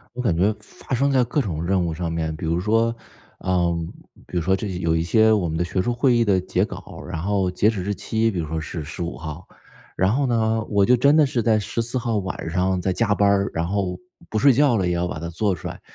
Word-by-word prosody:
我 125 - -3
感 100 -9 +1
觉 100 +5 +2
发 115 +4 -6
生 140 +3 +2
在 130 -2 +4
各 130 +5 0
种 85 -7 -3
任 95 -1 +1
务 80 - -2
上 85 0 -3
面， 80 -1 -2
比 85 0 -6
如 85 +2 0
说 115 +4 +1 0.4
呃， 90 -2 +1 0.5
比 90 - -5
如 - - +1
说 95 +3 +2
这 105 - -4
几 90 -2 -4
有 80 -2 +1
一 80 - +1
些 110 +5 +4
我 100 -5 +2
们 80 0 -3
的 85 - +1
学 90 +2 -1
术 120 +5 -1
会 120 0 +3
议 120 - +3
的 95 -2 +3
截 - - 0
稿， - - -10
然 85 -2 -4
后 95 -1 0
截 105 +4 +2
止 100 -5 -3
日 100 +1 -1
期 110 +2 0
比 90 - -3
如 80 - -3
说 80 +1 -3
是 80 0 -5
15 85 +3 -5
号。 80 +2 -8 0.5
然 95 +3 +2
后 135 0 +1
呢， 110 -2 +1
我 100 -2 +3
就 125 - +5
真 140 +5 +4
的 155 -2 +6
是 125 -3 -1
在 110 0 +3
14 115 +4 -2
号 115 -3 -1
晚 95 -4 -4
上 90 +1 +1
在 95 0 -1
加 105 -2 +1
班 100 - +3
儿， 100 0 +2
然 85 +1 -2
后 95 -2 -2 0.3
不 110 - -2
睡 135 +4 +5
觉 135 -2 +3
了 90 -2 0
也 90 - 0
要 85 +1 0
把 75 - -5
它 85 - -5
做 95 +3 0
出 - - -7
来。 - - -8
95 Hz, 280 characters per minute, -23 LUFS, 85-115 Hz, 0.5 s, 的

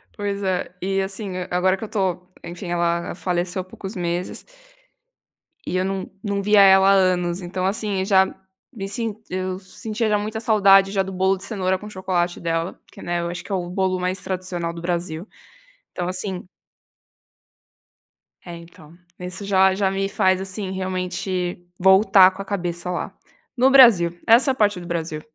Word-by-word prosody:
Pois 200 -1 -3
é, 185 -2 -1
e 195 +1 0
assim 195 0 -5 0.2
agora 185 +2 +2
que - - -9
eu 220 - -4
estou 185 -3 -2
enfim 175 +2 -7
ela 170 0 -1
faleceu 180 0 -2
há - - -8
poucos 190 +1 -8
meses 175 0 -4 1.2
e - - -3
eu 185 - 0
não 195 0 -3
não 200 -1 -1
via 205 0 +5
ela 190 0 +7
há 195 - +6
anos 180 -2 +1
então 185 +1 -3
assim 200 -1 0
já 190 -1 +5 0.5
me 195 -5 -5
sen 220 0 -3
eu 185 0 -3
sentia 215 +4 -4
já 210 - +3
muita 215 +2 -4
saudade 195 -3 +5
já 195 -1 +1
do 190 - -7
bolo 190 +1 +1
de 190 - -10
cenoura 190 -3 -1
com 210 - -9
chocolate 180 -3 -2
dela, 165 +1 -2
porque, - - -15
né, 175 0 -2
eu 170 - -3
acho 175 +1 -6
que - - -11
é - - +1
o 175 -2 -3
bolo 185 0 0
mais 185 +1 -2
tradicional 180 -2 -4
do 170 - -8
Brasil, 170 +1 -3 0.6
então 175 -1 -4
assim 185 0 -4 2.0
É 175 -1 -7
então, 170 -1 -15 0.2
isso 180 +3 -7
já 190 -1 +4
já 195 0 +1
me 195 0 -1
faz 190 -2 +2
assim 190 0 -4
realmente 185 -1 -3 0.2
voltar 190 0 +6
com 185 - -8
a - - -7
cabeça 175 -3 -3
lá, 180 - -4 0.4
no 255 +2 +5
Brasil, 200 -11 +6
essa 240 +4 +6
é - - 0
a - - -9
parte 205 -5 +2
do 175 - -9
Brasil. 160 -3 -3
185 Hz, 180 wpm, -22 LUFS, 180-195 Hz, 2.0 s, ela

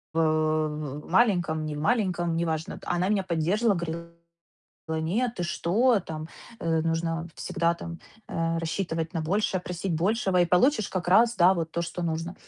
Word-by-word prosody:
в - - +2
в 155 -2 0
маленьком, 175 -7 +2
немаленьком- 175 +2 0
неважно. 160 -1 -2
Она 180 +2 0
меня 205 -2 +2
поддерживала, 185 +4 +1
говорила: 170 0 -5 1.0
"Нет, 245 -1 0
ты - - 0
что? 210 +8 +2
Там, 155 -3 -6 0.3
э, 165 -1 +1
нужно 165 +1 -1
всегда, 170 -2 0
там, 170 0 -8 0.3
э, 165 0 -1
рассчитывать 165 -1 -2
на 165 - -1
большее, 185 +3 0
просить 180 0 -3
большего 190 +2 +1
и 175 - +5
получишь 210 - +3
как 185 -2 -3
раз, 230 +6 +5
да, 180 -1 +6
вот 165 -3 -3
то, 170 - -1
что 175 +1 -5
нужно" 165 +2 -2
170 Hz, 155 wpm, -27 LUFS, 160-190 Hz, 1.0 s, да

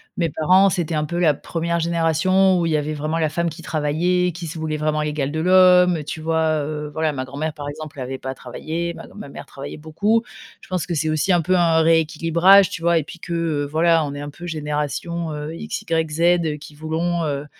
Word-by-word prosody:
mes 170 -2 0
parents, 185 +6 +4
c'était 170 -3 -2
un 150 - 0
peu 170 +3 -4
la 160 -4 +4
première 170 +3 -3
génération 170 +3 +2
où 170 - 0
il 165 - 0
y 155 - +3
avait 150 +1 -2
vraiment 155 +2 -2
la 160 -1 +1
femme 170 +2 -1
qui 165 +2 -10
travaillait, 175 +4 0
qui 170 0 -7
se 160 - -7
voulait 155 -1 -2
vraiment 155 0 0
l'égale 150 -2 -2
de 160 - -3
l'homme, 180 -2 +5
tu 155 +2 -6
vois? 160 -1 +1
Heu, 150 0 -4
voilà, 160 -1 0
ma 130 -2 -4
grand-mère, 145 +4 -4
par 145 -2 -7
exemple, 150 -1 -8
avait 130 +1 -5
pas 130 0 -5
travaillé. 165 +7 -5
Ma - - -10
gr - - -18
ma 210 - -8
mère - - -10
travaillait 140 +1 -8
beaucoup. 200 +9 0 0.4
Je - - -15
pense 185 -2 -1
que 175 - -4
c'est 155 +1 0
aussi 155 +4 +1
un 175 - +3
peu 185 +3 +2
un 165 -2 +3
rééquilibrage, 165 +4 +4
tu 165 - -6
vois? 170 0 +3
Et - - -3
puis 175 - -11
que, 170 - -6
heu, 155 -4 -1
voilà, 165 0 +3
on 140 - -5
est 145 - -6
un 145 - -6
peu 175 +4 -10
génération, 155 +2 -3
heu, 150 +1 -5
XYZ 165 0 0
qui 150 - -12
voulons, 165 +3 -2
heu, 145 -1 -3
160 Hz, 230 wpm, -21 LUFS, 150-170 Hz, 0.4 s, l'homme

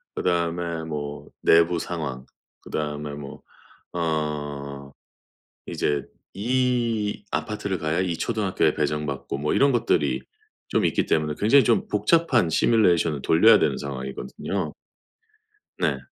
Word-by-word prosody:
그다음에 85 -1 -1
뭐 75 -2 -5 0.2
내부 85 +1 +4
상황, 75 -7 -4 0.4
그다음에 75 -1 -4
뭐 70 -1 -9 0.5
어 75 -4 -3 0.8
이제 75 -1 -1 0.3
이 120 -2 0
아파트를 105 -3 -2
가야 80 +1 -1
이 90 -2 -1
초등학교에 - - +1
배정받고 75 -2 -2
뭐 75 +1 -1
이런 140 0 +4
것들이 70 - +1 0.5
좀 - - +1
있기 - - +1
때문에 75 -1 +1
굉장히 130 +7 +5
좀 - - +2
복잡한 125 - +2
시뮬레이션을 85 - +3
돌려야 80 - +6
되는 - - +1
상황이거든요. 70 +7 -4 1.1
네. - - +1
80 Hz, 265 characters per minute, -24 LUFS, 75-105 Hz, 1.1 s, 돌려야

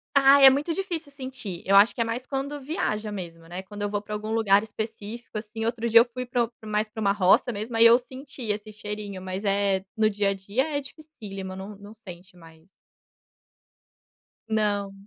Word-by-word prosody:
Ai, 275 0 +7
é 265 - +12
muito 295 +5 0
difícil 340 -7 -4
sentir, 255 -10 -6
eu 195 +1 +4
acho 205 +3 +6
que - - -6
é - - +3
mais 235 +3 -4
quando 280 +1 -4
viaja, 220 - -2
mesmo, 165 -4 -8
né, 180 +3 -6
quando 205 +1 -9
eu 205 - 0
vou 205 0 -2
para 210 - -9
algum 215 +1 -4
lugar 205 -3 +4
específico, 220 +1 -6
assim, 225 +1 -6
outro 235 0 -1
dia 230 +1 +8
eu - - +5
fui 250 +1 -7
para 245 -1 +1 0.2
o - - -9
mais 215 0 0
para 220 +1 -8
uma 200 -1 +3
roça, 205 +5 +3
mesmo, 220 +3 -5
aí 230 +1 +7
eu 230 +1 +8
senti 260 +2 -9
esse 210 +1 -3
cheirinho, 210 -2 -6
mas 190 +2 -5
é 195 -1 +1
no 215 0 +3
dia 200 -1 +1
a - - -1
dia 250 +11 -2
é - - 0
dificílima, 220 -11 -9
não 195 +2 -8
não 205 +2 -13
sente 180 -3 -13
mais. 165 0 -17 1.8
Não. 205 -2 0
215 Hz, 205 wpm, -26 LUFS, 200-245 Hz, 1.8 s, é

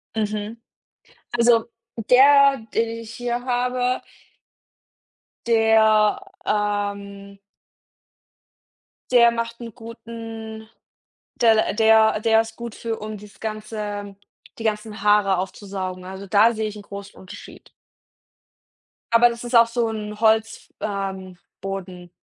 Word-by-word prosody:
Mhm, 215 +1 -3 0.8
also, 235 -1 +4 0.4
der, 275 -1 +6
den 230 0 +1
ich 225 -1 -10
hier 245 0 -3
habe 250 0 0 1.5
der, 220 - +4 0.3
ähm 200 -1 -3 1.7
der 235 -1 +6
macht 230 0 -4
'nen 230 -2 -8
guten 225 -1 -9 0.7
der 225 -2 +4
der 220 0 +4
der 225 -1 +4
ist 225 0 -9
gut 235 -2 -7
für 225 -1 -4
um 215 0 -6
das 205 0 -15
ganze 210 -2 -5 0.4
die - - -6
ganzen 215 0 -3
Haare 205 -2 +4
aufzusaugen. 185 -1 -5
Also, 190 +1 -8
da 215 +5 +4
sehe 220 -1 -2
ich 210 - -10
'n - - -9
großen 200 0 -10
Unterschied. 185 - -13 1.4
Aber 240 +1 +6
das 235 0 -7
ist 240 0 -3
auch 230 0 +7
so 230 -1 -1
'n 210 -1 -6
Holz 220 0 +1
ähm, 190 -3 -4 0.2
Boden. 185 -2 -6
220 Hz, 115 wpm, -22 LUFS, 205-230 Hz, 1.7 s, auch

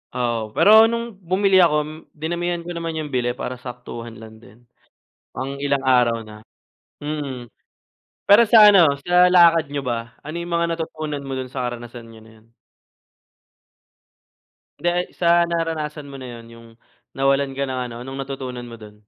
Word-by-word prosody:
Oo, 115 -3 -2
pero 220 +2 +7
nung 235 0 -3
bumili 190 +1 +2
ako 170 -4 +4
m 150 - -9 0.3
dinamihan 170 +2 -3
ko 175 - -7
naman 165 -1 -5
yung 155 -2 -5
bili 120 -1 -1
para 125 -1 -6
saktuhan 120 -2 -9
lang 110 0 -13
din, 115 +1 -19 0.7
pang 135 +1 -5
ilang 140 -1 -1
araw 125 -3 +2
na. 110 0 -13 0.5
Mm. 145 -4 -5 0.8
Pero 205 +3 +6
sa 210 -2 +8
ano, 165 -8 +5
sa 180 0 +5
lakad 170 -3 +5
niyo 140 -1 -4
ba, 120 -1 -4
ano 155 +3 -7
yung 170 0 -3
mga 170 0 0
natutunan 155 -3 -4
mo 135 - -4
dun 130 -1 -6
sa 125 -2 -3
karanasan 120 -1 -8
niyo 110 -1 -15
na 110 - -17
yun? 110 - -27 2.3
Hindi, 175 - +1
ay, 180 0 -1
sa 170 0 +2
naranasan 155 -3 -3
mo 135 -1 -10
na 120 -2 -8
yon, 115 - -13
yung 115 0 -15 0.5
nawalan 135 0 +2
ka 140 - 0
ng 130 -1 -4
ano, 115 - -9
anong 135 0 -7
natutunan 130 -3 -7
mo 115 - -10
dun? 105 -1 -15
140 Hz, 170 wpm, -21 LUFS, 120-170 Hz, 2.3 s, sa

